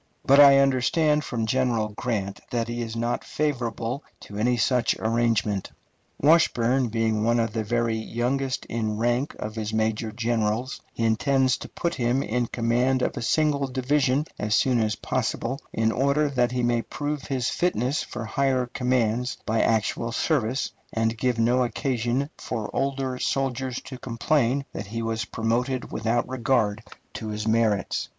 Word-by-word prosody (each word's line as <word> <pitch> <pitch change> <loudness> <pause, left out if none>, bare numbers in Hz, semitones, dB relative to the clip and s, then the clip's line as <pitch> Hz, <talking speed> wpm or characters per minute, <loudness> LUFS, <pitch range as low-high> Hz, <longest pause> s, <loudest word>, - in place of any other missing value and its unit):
But 140 +1 +6
I 140 -1 +9
understand 140 +3 +3
from 115 -6 -2
General 120 -2 +1
Grant 105 -3 -3
that 115 -1 -1
he 120 0 -3
is 115 -1 -4
not 120 +1 -1
favorable 125 -3 -2 0.2
to 100 - -11
any 120 +4 +1
such 120 0 +2
arrangement. 110 -3 0 0.5
Washburn 135 -5 +3
being 110 -1 0
one 120 +1 +2
of 115 -1 0
the 110 -1 -1
very 115 +1 0
youngest 125 +4 -2
in 110 -2 -2
rank 120 +5 0
of 105 - -5
his 110 -1 -4
major 110 0 0
generals, 115 +1 -1
he 115 - -4
intends 130 +3 +2
to - - -9
put 170 - -2
him 125 +2 +1
in 120 +1 -1
command 125 +3 +1
of - - -1
a - - -4
single 145 +2 +1
division 135 +2 +1
as 105 0 +1
soon 125 -3 +3
as 110 -1 +1
possible, 125 +2 -2
in 110 0 +1
order 140 +4 +2
that 125 -3 +1
he 125 -1 -1
may 120 -1 +2
prove 145 +2 -4
his 130 -4 -1
fitness 140 -5 0
for 115 - -6
higher 130 +2 +1
commands 125 -1 0
by 110 +1 +1
actual 115 +1 0
service, 130 -1 0 0.2
and 115 0 0
give 125 +1 0
no 120 +3 +3
occasion 120 +3 -1
for 115 -4 -4
older 135 -2 -1
soldiers 130 -1 -1
to 130 -2 -9
complain 135 +2 0
that 100 - -5
he 115 +3 -4
is 115 0 -2
promoted 120 +3 -1
without 115 +2 0
regard 120 -4 +1 0.3
to 110 - -6
his 105 0 -3
merits. 110 -2 +1
120 Hz, 160 wpm, -25 LUFS, 115-130 Hz, 0.5 s, I